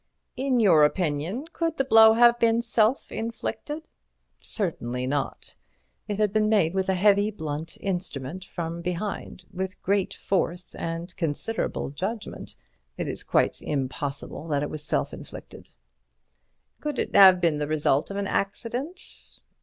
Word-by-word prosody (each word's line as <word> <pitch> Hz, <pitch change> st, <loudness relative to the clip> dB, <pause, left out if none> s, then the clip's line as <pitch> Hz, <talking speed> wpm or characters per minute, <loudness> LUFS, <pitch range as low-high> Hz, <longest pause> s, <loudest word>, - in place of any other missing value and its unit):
"In 260 Hz, -1 st, +1 dB
your 175 Hz, -9 st, +6 dB
opinion, 165 Hz, -, 0 dB
could 330 Hz, -1 st, -1 dB
the 270 Hz, -, +1 dB
blow 225 Hz, -3 st, +8 dB
have 240 Hz, 0 st, +6 dB
been 230 Hz, 0 st, +3 dB
self 230 Hz, +2 st, +2 dB
inflicted?" 235 Hz, +7 st, -5 dB, 0.5 s
"Certainly 125 Hz, -, 0 dB
not. 140 Hz, +1 st, -3 dB, 0.5 s
It 205 Hz, -2 st, -2 dB
had 210 Hz, -2 st, +1 dB
been 215 Hz, -1 st, +2 dB
made 195 Hz, -7 st, +3 dB
with 190 Hz, 0 st, -1 dB
a 190 Hz, -, +3 dB
heavy, 205 Hz, +2 st, +4 dB
blunt 160 Hz, -5 st, -5 dB
instrument 180 Hz, -4 st, -3 dB
from 170 Hz, -2 st, -5 dB
behind, 180 Hz, +1 st, -4 dB
with 185 Hz, 0 st, -4 dB
great 195 Hz, 0 st, 0 dB
force 180 Hz, -1 st, -1 dB
and 165 Hz, +2 st, -5 dB
considerable 165 Hz, +1 st, -2 dB
judgment. 210 Hz, +9 st, -5 dB, 0.4 s
It -, -, -3 dB
is -, -, -4 dB
quite -, -, +1 dB
impossible 140 Hz, +2 st, -4 dB
that 145 Hz, -2 st, 0 dB
it 150 Hz, -, -4 dB
was 155 Hz, -1 st, -3 dB
self 70 Hz, -, 0 dB
inflicted." -, -, -10 dB, 1.1 s
"Could 295 Hz, -3 st, -4 dB
it -, -, -2 dB
have 190 Hz, -2 st, +9 dB
been 165 Hz, -4 st, +1 dB
the 150 Hz, -, -1 dB
result 150 Hz, -2 st, +1 dB
of 200 Hz, -, -5 dB
an 200 Hz, -, -1 dB
accident?" 240 Hz, -, -3 dB
190 Hz, 145 wpm, -26 LUFS, 155-220 Hz, 1.1 s, have